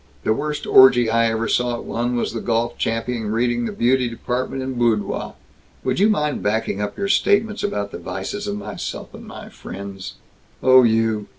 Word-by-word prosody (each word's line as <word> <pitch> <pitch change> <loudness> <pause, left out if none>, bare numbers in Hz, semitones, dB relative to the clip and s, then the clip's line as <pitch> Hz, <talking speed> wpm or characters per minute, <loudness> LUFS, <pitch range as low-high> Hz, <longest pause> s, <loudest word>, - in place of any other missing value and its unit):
The 110 - +2
worst 150 +5 -3
orgy 120 -3 +6
I 115 0 +3
ever 115 0 -1
saw 120 +1 +1
at - - -7
one 120 +1 -2
was 120 - -1
the 115 - -4
golf 120 +1 -1
champion 115 -1 -2
reading 120 +1 0
the - - -3
beauty 125 +1 +1
department 125 +3 -3
in 130 0 -4
Boudoir. 120 -4 -1 0.5
Would - - -1
you 205 +3 +5
mind 150 -8 0
backing 105 -1 -1
up 105 0 -4
your 200 - -1
statements 210 +2 +2
about 100 - -2
the - - -7
vices 205 0 -5
of 205 0 -3
myself 210 - -6
and - - -11
my - - -10
friends 95 0 -8 0.2
" - - -29
"Oh, 130 0 +7
you. 110 -3 +1
120 Hz, 190 wpm, -21 LUFS, 110-130 Hz, 0.5 s, Oh